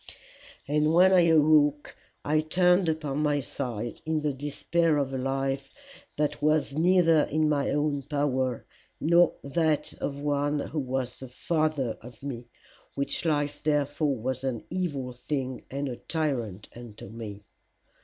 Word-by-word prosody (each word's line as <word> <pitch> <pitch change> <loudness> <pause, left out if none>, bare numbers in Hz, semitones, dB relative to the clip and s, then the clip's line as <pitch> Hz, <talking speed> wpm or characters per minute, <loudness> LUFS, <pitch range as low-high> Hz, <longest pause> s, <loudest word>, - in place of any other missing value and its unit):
"'And 150 +2 +2
when 185 +2 +6
I 175 -2 +6
awoke 150 -2 +4 0.3
I 155 +1 +2
turned 180 +2 +3
upon 150 -3 -2
my 150 -1 +2
side 120 -4 -4
in 160 -1 -1
the 150 -1 0
despair 150 +3 0
of 135 -2 -1
a - - -1
life 135 +1 -2 0.5
that 150 0 -1
was 155 -1 +2
neither 165 -1 +4
in 155 +1 +1
my 145 -2 +1
own 145 -1 0
power 130 -3 -1 0.3
nor 170 +2 +4
in 140 - -8
that 155 0 +1
of 140 - -2
one 145 0 0
who 150 +2 -3
was 130 -2 -3
the 130 - -8
Father 155 -2 -1
of 120 +1 -13
me, 125 -4 -6 0.5
which 140 +4 -2
life 145 -2 0
therefore 145 -1 +1
was 130 +3 -3
an 130 -4 -2
evil 145 -9 -2
thing 130 +1 -4
and 140 +1 -3
a 125 -2 -5
tyrant 120 - -3
unto 115 -5 -10
me. 105 -1 -8
145 Hz, 150 wpm, -27 LUFS, 130-155 Hz, 0.5 s, when